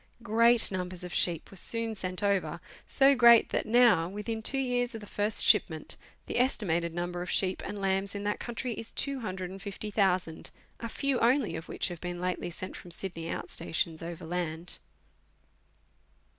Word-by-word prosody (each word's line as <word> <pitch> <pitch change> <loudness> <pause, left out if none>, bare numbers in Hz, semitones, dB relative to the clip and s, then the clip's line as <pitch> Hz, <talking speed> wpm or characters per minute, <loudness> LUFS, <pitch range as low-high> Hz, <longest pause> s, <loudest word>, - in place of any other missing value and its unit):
Great 230 +1 +5
numbers 180 -1 -4
of 180 - -6
sheep 170 -3 0
were - - -11
soon 230 +4 0
sent 185 -1 -4
over, 200 -2 +1 0.3
so 275 0 +5
great 235 -3 +7
that - - -1
now, 230 -8 +5
within 210 +3 -4
two 270 +5 +1
years 245 -2 0
of - - -5
the 210 - -10
first 205 +1 +1
shipment, - - +2 0.3
the - - -1
estimated 175 -10 +1
number 175 +1 -3
of 180 - -5
sheep 190 -1 0
and 205 - -5
lambs 195 +1 0
in 200 - -4
that 205 0 -1
country 240 0 -4
is 225 0 -6
250,000, 195 - -2 0.3
a 230 - -5
few 275 +1 0
only 240 - +2
of 160 +2 -7
which - - -1
have 175 -2 -8
been 175 -1 -4
lately 180 -1 -2
sent 185 +2 -6
from 175 - -10
Sydney 170 -2 -6
out - - -4
stations 160 0 -2
overland. 170 0 -4
195 Hz, 165 wpm, -30 LUFS, 175-230 Hz, 0.3 s, great